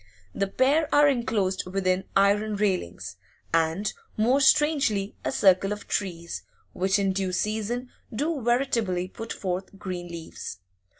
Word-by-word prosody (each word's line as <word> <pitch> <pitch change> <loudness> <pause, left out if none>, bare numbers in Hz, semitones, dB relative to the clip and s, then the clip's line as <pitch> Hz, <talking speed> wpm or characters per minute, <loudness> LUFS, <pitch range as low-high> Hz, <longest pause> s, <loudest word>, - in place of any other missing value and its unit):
The 195 - 0
pair 280 +9 +2
are 290 0 +6
enclosed 215 -9 0
within 185 0 0
iron 205 +2 +3
railings, 100 - -2 0.4
and, 165 +5 +1 0.2
more 245 +6 +3
strangely, 270 -8 +3
a - - -1
circle 195 -5 +4
of 210 0 -5
trees, 170 -4 -3 0.3
which 190 +2 +1
in 195 -1 +1
due 190 -1 -1
season 220 +6 -2 0.2
do 290 +5 -1
veritably 230 -7 +1
put 225 +3 -7
forth 190 +1 -4
green 180 -3 -5
leaves. 165 - -7
200 Hz, 130 wpm, -26 LUFS, 185-240 Hz, 0.4 s, are